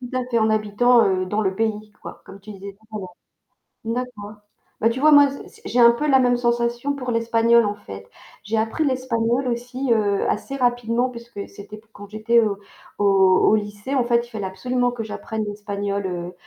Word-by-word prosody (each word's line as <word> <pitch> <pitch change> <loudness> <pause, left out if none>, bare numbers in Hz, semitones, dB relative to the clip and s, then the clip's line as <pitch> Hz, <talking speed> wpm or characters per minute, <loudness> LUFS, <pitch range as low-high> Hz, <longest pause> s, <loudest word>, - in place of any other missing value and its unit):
Tout 250 0 -7
à 255 - 0
fait, 235 - +1
en 220 0 +2
habitant, 215 +3 +3
heu, 185 -1 0
dans 210 +4 -1
le 190 -2 -1
pays, 215 -1 -2
quoi, - - -10
comme 195 - -13
tu 210 +2 -11
disais 195 0 -10
tout 220 0 -13
à - - -3
l'heure. 185 -2 -9 0.7
D'accord. 225 -3 -5 0.4
Bah 225 - +3
tu 255 +4 -3
vois, 310 - +6
moi, 285 -1 +7
c 275 - -9
c'est - - -20
j'ai 245 - +1
un 235 0 +8
peu 265 +6 -2
la 270 -2 +5
même 245 -1 +3
sensation 240 +3 0
pour 250 -3 -4
l'espagnol, 230 0 +3
en 205 0 -2
fait. 100 - -11 0.4
J'ai 215 +3 -2
appris 225 +8 0
l'espagnol 255 -1 0
aussi, 245 +2 -3
heu, 205 -3 +1
assez 275 - -3
rapidement 245 -1 0
puisque 235 -4 -9
c'était 200 +1 -11
p 215 - -18
quand 205 -2 -12
j'étais 215 +3 +2
au 210 -3 0 0.4
au - - +1 0.5
au - - +5
lycée, 210 +5 -5
en 255 -3 +2
fait, 235 0 +1
il - - -19
fallait 215 -4 -5
absolument 245 +6 -1
que 240 -2 -5
j'apprenne 220 0 -5
l'espagnol, 205 -1 -4
heu 175 -1 -5
230 Hz, 210 wpm, -22 LUFS, 205-245 Hz, 0.7 s, un